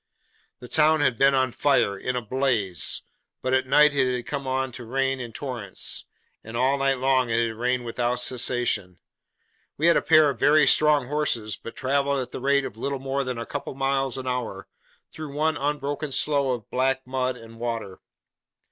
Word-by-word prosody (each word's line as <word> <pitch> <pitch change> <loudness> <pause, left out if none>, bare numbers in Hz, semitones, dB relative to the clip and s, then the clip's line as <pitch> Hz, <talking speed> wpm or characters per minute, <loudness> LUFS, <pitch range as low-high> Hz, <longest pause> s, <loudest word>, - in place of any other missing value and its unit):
The 125 - -9
town 155 +2 +3
had 130 -5 +1
been 135 0 +5
on 130 -1 +2
fire; 135 -7 +2
in 125 +6 -3
a 125 - -2
blaze. 115 - 0 0.4
But 130 - 0
at 130 0 +2
night 150 +2 +5
it 130 -2 +1
had 125 - -5
come 140 -2 -4
on 130 0 -1
to 120 0 -8
rain 135 +2 -1
in 120 -2 -6
torrents, 120 -6 -4 0.4
and 115 +1 -6
all 135 +3 +2
night 135 -1 +2
long 130 -1 +2
it 115 +1 +2
had 110 - -7
rained 125 +1 -1
without 120 +1 -1
cessation. 120 -7 -1 0.8
We 155 - 0
had 170 - +6
a - - +2
pair 155 -2 +5
of 130 - -10
very 150 +1 +5
strong 150 0 +4
horses, 125 -7 -1
but 115 - -10
travelled 140 +1 0
at 130 - -5
the - - -6
rate 140 +1 +2
of 115 -5 -7
little 140 +4 -2
more 135 +1 -2
than 130 -2 -4
a 115 - -4
couple 145 +2 -5
of - - -17
miles 135 -1 0
an 130 - -6
hour, 125 -6 -4 0.4
through 155 -3 -8
one 155 +1 +1
unbroken 145 0 -2
slough 140 0 +1
of - - -38
black 130 +1 0
mud 130 -1 -2
and 115 0 -13
water. 115 -5 -4
130 Hz, 195 wpm, -25 LUFS, 120-140 Hz, 0.8 s, had